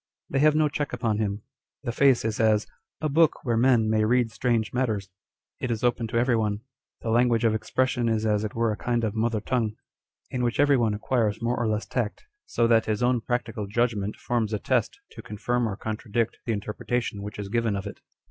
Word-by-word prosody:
They 135 - +1
have 150 +1 +5
no 155 0 +4
check 145 -1 -3
upon 115 -3 0
him. 105 -1 -2 0.4
The 120 - -2
face 130 -1 +3
is 110 -1 -2
as 110 -1 +3 0.2
" 105 - -50
a 155 - +1
book 155 +1 +2
where 120 -2 +1
men 120 -1 +4
may 110 0 +2
read 120 +1 +2
strange 115 -2 0
matters 110 -7 -1 0.3
:" - - -62
it 130 - -2
is 115 -1 -2
open 120 -1 +1
to 115 +1 -2
every 120 +1 +3
one: 105 -2 0 0.4
the 115 - -1
lan 120 +2 +4
guage 115 -1 +1
of 115 -2 +3
expression 120 +2 0
is 110 -1 0
as 105 -1 +1
it 105 - -4
were 115 -1 +1
a - - -2
kind 120 -1 -1
of 110 -3 0
mother 110 0 0
tongue, 110 -1 -1 0.6
in 125 - -2
which 120 -1 -1
every 145 -1 +5
one 115 -4 +1
acquires 110 -1 0
more 120 +1 0
or 120 -2 -1
less 110 0 -1
tact, 115 -4 -3 0.2
so 115 - +1
that 115 -1 +3
his 110 +2 0
own 125 -1 +2
practical 115 -3 -3
judgment 105 -2 0
forms 115 -3 -1
a - - +1
test - - 0
to - - -10
confirm 115 +3 -1
or 100 - -3
contra 110 0 -6
dict 115 +1 0
the - - +1
interpretation 105 +1 -3
which 105 +1 -7
is 100 -1 -5
given 115 -1 0
of 100 0 -4
it. 100 - -8
115 Hz, 230 wpm, -26 LUFS, 110-120 Hz, 0.6 s, have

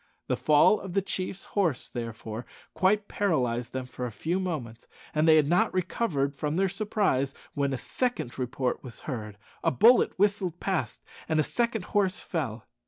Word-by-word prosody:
The - - 0
fall 150 +7 +5
of 190 -2 -7
the 195 - +3
chief's 185 0 -3
horse, 170 -11 0
therefore, 115 -1 -6 0.3
quite 205 +2 +2
paralyzed 125 - 0
them 130 -1 -3
for 125 0 -5
a - - -7
few 165 - -1
moments, 135 -12 -4 0.3
and 155 +1 +2
they 160 - +8
had 155 -2 +4
not 175 +3 +3
recovered 175 -7 0
from 150 +2 -2
their 190 +2 +2
surprise 195 -9 0 0.2
when 140 -1 0
a 135 - -1
second 205 - -2
report 125 0 -2
was 125 -3 -9
heard, 105 -7 -5 0.3
a - - +4
bullet 235 - +5
whistled 195 -3 +1
past, 190 -4 -2 0.3
and 160 -1 +2
a - - +4
second 235 -1 -1
horse 200 -1 +2
fell. 125 - -3
155 Hz, 170 wpm, -28 LUFS, 125-195 Hz, 0.3 s, they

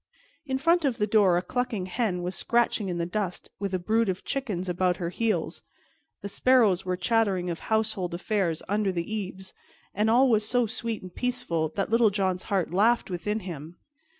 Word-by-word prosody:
In 265 -1 0
front 335 +4 +3
of 265 -5 +1
the 210 - +1
door 200 -4 +4
a 175 - -1
clucking 225 -2 -2
hen 185 -2 -1
was 180 +1 -3
scratching 235 -4 +1
in 175 - -2
the 170 - -1
dust 185 0 -3
with 200 -1 -2
a 185 - +1
brood 220 +4 +1
of 185 0 -3
chickens 210 -10 -2
about 180 0 +1
her 170 -2 -3
heels, 225 +2 -1 0.6
the - - -3
sparrows 210 -4 +3
were 185 -1 -2
chattering 190 -3 +1
of 165 - -5
household 220 -5 -1
affairs 180 -3 -1
under 205 0 +1
the 175 +3 -3
eaves, 190 -2 -5 0.4
and 210 +2 +1
all 250 +4 +5
was 220 -4 +3
so 245 +3 +2
sweet 225 0 -4
and 185 -1 -10
peaceful 245 -11 -1
that 195 +1 -1
Little 230 -1 +5
John's 190 -2 0
heart 190 -4 0
laughed 220 +2 +3
within 210 +5 -2
him. 170 -3 -8
200 Hz, 190 wpm, -27 LUFS, 180-225 Hz, 0.6 s, all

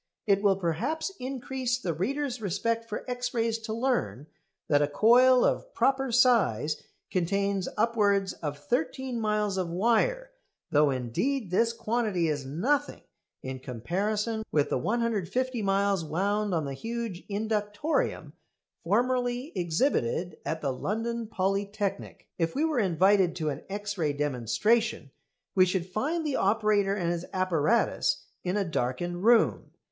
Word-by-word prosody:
It 200 -3 +3
will 200 -2 +4
perhaps 195 - -2
increase 255 -1 -2
the 185 -10 -2
reader's 250 - -2
respect 230 +4 -1
for 210 - -5
X 245 0 -3
rays 230 -1 0
to 225 0 -6
learn 230 - -1 0.4
that 145 -1 +3
a 145 - +3
coil 245 - +5
of - - 0
proper 270 -1 +2
size 225 - +3 0.3
contains 195 +1 0
upwards 205 -3 +2
of 145 -3 -5
thirteen 230 - -2
miles 210 -2 0
of 180 -2 -2
wire; 240 - +1 0.4
though 150 0 +4
indeed 170 - -1
this 230 +5 +3
quantity 220 -7 0
is 145 -3 -2
nothing 265 - 0 0.4
in 130 0 -5
comparison 205 - -2
with 145 -2 +1
the - - +1
150 235 - -1
miles 195 -2 +1
wound 200 +6 0
on 165 -4 0
the 140 - -4
huge 225 - -5
inductorium 210 +6 -1 0.5
formerly 245 - 0
exhibited 175 - 0
at 160 0 -3
the 140 -3 -1
London 225 - -3
Polytechnic. 200 0 -2
If 165 -1 0
we 300 +4 +2
were 310 -5 0
invited 190 -1 +3
to 155 -3 -1
an 145 +1 -4
X 205 0 -4
ray 150 -3 +1
demonstration 145 - 0 0.4
we 185 -1 +5
should 180 -1 -1
find 290 - -2
the 290 -3 0
operator 205 -1 +2
and 175 -4 -1
his 175 0 -4
apparatus 185 +3 +1 0.2
in 180 +3 -1
a 200 - +1
darkened 175 +4 -2
room. 235 +1 +4
205 Hz, 140 wpm, -28 LUFS, 170-235 Hz, 0.5 s, coil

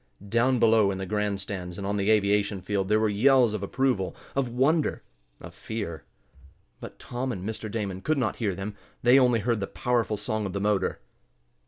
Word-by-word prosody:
Down 120 +4 +3
below 110 -3 +4
in 95 - -2
the 95 - -4
grand 105 0 -1
stands, 90 -3 -5
and 100 - -5
on 100 +1 -1
the 100 0 0
aviation 105 -1 +2
field, 95 0 -2
there 105 +1 +3
were 110 - +2
yells 120 +2 +4
of 105 - -3
approval 105 -2 0 0.2
of 135 -3 0
wonder 145 +6 +1 0.4
of - - -11
fear. 100 -8 -6 0.7
But - - -9
Tom 125 +2 -4
and 95 -3 -5
Mr. 110 0 -4
Damon 100 -4 -4
could 155 +6 0
not 120 -5 -1
hear 105 -5 -1
them. 100 +2 -5 0.3
They 125 +3 +7
only 125 -3 +3
heard 115 +1 0
the 100 - -3
powerful 120 -3 -1
song 105 0 -2
of 95 - -7
the 100 - -2
motor. 105 -1 0
105 Hz, 195 wpm, -27 LUFS, 100-120 Hz, 0.7 s, They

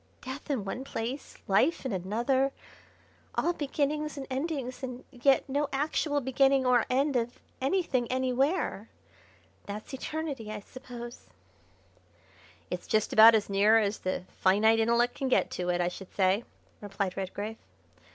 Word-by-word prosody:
death 265 +4 -7
in 255 -8 -1
one 245 +7 -4
place, 255 +1 -5
life 260 - +2
in 255 - -1
another, 240 +9 +1 0.8
all 345 - +1
beginnings 300 0 -1
and 270 - -5
endings, 270 -2 -3
and 255 -1 -6
yet 265 +3 +3
no 285 +2 0
actual 290 +1 0
beginning 270 0 +3
or 245 -2 +3
end 275 +2 +1
of 240 0 -1 0.2
anything 265 -5 0
anywhere. 260 - 0 0.8
That's 210 +5 -7
eternity, 275 -4 -4
I 210 -1 -5
suppose." 240 +1 -10 1.4
"It's - - -4
just 215 -1 +1
about 225 +1 +9
as 215 - +1
near 205 +3 +5
as 210 -1 +1
the 185 -1 -2 0.2
finite 215 +4 +4
intellect 235 +2 +3
can 270 - -3
get 260 - +2
to 180 0 -3
it, 175 0 +1
I 175 - +2
should 180 +1 -7
say," 195 +3 +2 0.4
replied 200 -2 -3
Redgrave. 205 +3 -4
245 Hz, 140 wpm, -29 LUFS, 215-275 Hz, 1.4 s, about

